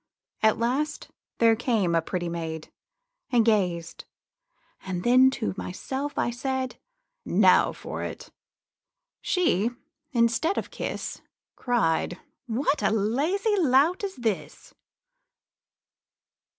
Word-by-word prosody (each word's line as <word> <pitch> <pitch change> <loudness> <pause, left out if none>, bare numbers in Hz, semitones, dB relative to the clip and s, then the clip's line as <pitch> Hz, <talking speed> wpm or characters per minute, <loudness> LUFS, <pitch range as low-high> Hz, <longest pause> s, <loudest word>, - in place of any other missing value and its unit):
At 220 0 +4
last 270 +6 -1 0.3
there 230 -1 +5
came 220 -7 +1
a 165 - +3
pretty 175 +1 -3
maid, 160 -2 -5 0.6
And 235 -3 +3
gazed; 180 -6 0 0.8
then 240 +8 +4
to 240 -6 -3
myself 270 +11 -4
I 240 - +1
said, 260 +1 -3 0.4
'Now - - +4
for - - -7
it!' - - -7 0.9
She, 240 - +2 0.4
instead 235 - +2
of - - -3
kiss, - - -5 0.3
Cried, 180 -7 0 0.3
'What 270 +5 0
a - - +3
lazy 285 - +1
lout 305 +5 +3
is 395 -1 -3
this!' 225 -6 -4
235 Hz, 100 wpm, -26 LUFS, 190-270 Hz, 0.9 s, there